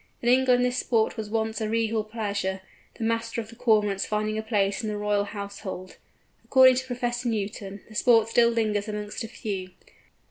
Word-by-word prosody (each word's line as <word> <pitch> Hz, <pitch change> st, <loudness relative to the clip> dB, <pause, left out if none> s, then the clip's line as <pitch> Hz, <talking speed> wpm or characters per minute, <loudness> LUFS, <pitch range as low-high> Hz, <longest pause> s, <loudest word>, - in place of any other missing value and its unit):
In 240 Hz, -, +2 dB
England 250 Hz, -1 st, +4 dB
this 250 Hz, 0 st, 0 dB
sport 225 Hz, -2 st, +1 dB
was 220 Hz, -2 st, -5 dB
once 220 Hz, 0 st, -1 dB
a 215 Hz, -, -1 dB
regal 225 Hz, -1 st, 0 dB
pleasure, 205 Hz, -3 st, -3 dB, 0.3 s
the -, -, -6 dB
Master 230 Hz, +1 st, -1 dB
of 220 Hz, -1 st, -6 dB
the 230 Hz, -, -12 dB
Cormorants 210 Hz, -4 st, +2 dB
finding 215 Hz, 0 st, -1 dB
a 220 Hz, -, -1 dB
place 205 Hz, -1 st, 0 dB
in 220 Hz, -, -3 dB
the 210 Hz, -, -3 dB
Royal 205 Hz, -1 st, +1 dB
household. 200 Hz, -2 st, -7 dB, 0.5 s
According 260 Hz, -1 st, +6 dB
to 260 Hz, 0 st, -3 dB
Professor 245 Hz, -1 st, -2 dB
Newton, 200 Hz, -2 st, -4 dB
the 220 Hz, -, -14 dB
sport 225 Hz, -1 st, +4 dB
still 235 Hz, +1 st, +4 dB
lingers 215 Hz, -3 st, 0 dB
amongst 210 Hz, +2 st, -4 dB
a -, -, -5 dB
few. 200 Hz, -5 st, -5 dB
220 Hz, 185 wpm, -26 LUFS, 205-235 Hz, 0.5 s, According